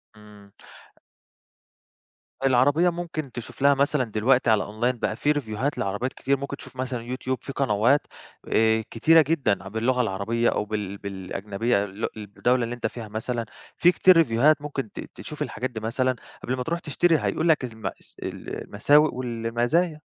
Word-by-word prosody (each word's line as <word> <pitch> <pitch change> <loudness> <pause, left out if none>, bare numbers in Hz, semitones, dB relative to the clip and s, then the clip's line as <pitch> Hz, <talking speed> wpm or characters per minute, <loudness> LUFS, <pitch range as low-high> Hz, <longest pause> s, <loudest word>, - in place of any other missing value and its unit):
إمم. 105 -1 -16 1.9
العربية 145 +7 +4
ممكن 165 -5 -5
تشوف 120 +2 -8
لها 140 0 +6
مثلًا 140 0 +2
دلوقتي 120 +2 +2
على 110 -1 +3
online 120 +4 -1
بقى 110 - -1
في 145 +5 +1
ريفيوهات 135 -1 -2
لعربيات 105 +6 -2
كتير، 140 +1 0
ممكن 140 +1 -5
تشوف - - -12
مثلًا 125 -1 -3
YouTube 130 0 -2
في - - -7
قنوات 130 +2 +2 0.4
آآ 110 0 +3
كتيرة 160 +8 +5
جدًا 140 -9 0
ع - - -9
باللغة 115 +5 +1
العربية 115 +2 0
أو - - -1
بال 105 -2 -4
بالأجنبية 100 +3 -2
لؤ 100 +3 -4
الدولة 120 +4 0
اللي 120 +1 -3
أنت 120 - -2
فيها، 115 -3 -8
مثلًا 115 +2 -3 0.3
في 175 - +6
كتير 185 0 +5
ريفيوهات 145 +1 +4
ممكن 140 -7 -4
ت - - -9 0.2
تشوف - - -9
الحاجات 130 +2 -2
دي 115 - -6
مثلًا 125 +4 0 0.3
قبْل 130 - -1
ما 125 - -2
ترُوح 170 +5 -2
تشتري، 165 +1 +2
هيقول 165 +1 0
لك 155 - +4
المأس 110 -5 -8
المساوئ 145 +9 +1
والمزايا. 120 +7 0
125 Hz, 160 wpm, -25 LUFS, 110-140 Hz, 1.9 s, لها